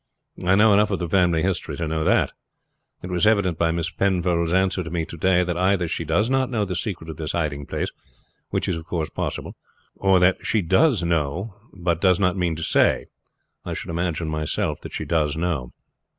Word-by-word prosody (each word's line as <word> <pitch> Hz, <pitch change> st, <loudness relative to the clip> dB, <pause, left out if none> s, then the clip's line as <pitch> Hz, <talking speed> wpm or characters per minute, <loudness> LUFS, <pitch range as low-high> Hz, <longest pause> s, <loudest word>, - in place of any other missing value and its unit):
I 90 Hz, +2 st, +4 dB
know 105 Hz, +1 st, +6 dB
enough 105 Hz, +1 st, +4 dB
of 95 Hz, -, 0 dB
the 85 Hz, -, -3 dB
family 85 Hz, -3 st, +2 dB
history 95 Hz, -2 st, -2 dB
to 80 Hz, -, -2 dB
know 80 Hz, 0 st, -1 dB
that. -, -, +2 dB, 0.7 s
It 90 Hz, -, -6 dB
was 90 Hz, +3 st, +2 dB
evident 100 Hz, -7 st, +2 dB
by 85 Hz, -, +3 dB
Miss 85 Hz, 0 st, -1 dB
Penfold's 85 Hz, -2 st, +1 dB
answer 95 Hz, 0 st, +1 dB
to 80 Hz, -, -7 dB
me 85 Hz, -1 st, -2 dB
to -, -, -9 dB
day 90 Hz, +2 st, +3 dB
that 90 Hz, -1 st, -2 dB
either 90 Hz, 0 st, +1 dB
she 85 Hz, -, -3 dB
does 85 Hz, +8 st, +2 dB
not 130 Hz, 0 st, +1 dB
know 110 Hz, -5 st, 0 dB
the 90 Hz, -2 st, -4 dB
secret 90 Hz, -2 st, -4 dB
of 80 Hz, -2 st, -7 dB
this 75 Hz, -1 st, -4 dB
hiding 75 Hz, -4 st, -2 dB
place -, -, -3 dB, 0.6 s
which -, -, -1 dB
is 90 Hz, -, 0 dB
of 80 Hz, -, -8 dB
course 80 Hz, -3 st, -3 dB
possible -, -, -4 dB, 0.4 s
or 95 Hz, -1 st, +3 dB
that 90 Hz, +1 st, +4 dB
if -, -, -8 dB
she 110 Hz, -4 st, +1 dB
does 115 Hz, -, +3 dB
know 85 Hz, +5 st, -1 dB, 0.2 s
she 85 Hz, -1 st, +1 dB
does 90 Hz, -1 st, +3 dB
not 90 Hz, -2 st, +2 dB
mean 90 Hz, -3 st, 0 dB
to 80 Hz, -, -5 dB
say. -, -, +2 dB, 0.5 s
I -, -, -4 dB
should -, -, -6 dB
imagine 85 Hz, -1 st, -2 dB
myself 75 Hz, -1 st, -2 dB
that -, -, -8 dB
she -, -, -4 dB
does 75 Hz, -3 st, 0 dB
know. 80 Hz, -8 st, -2 dB
90 Hz, 215 wpm, -23 LUFS, 80-95 Hz, 0.7 s, know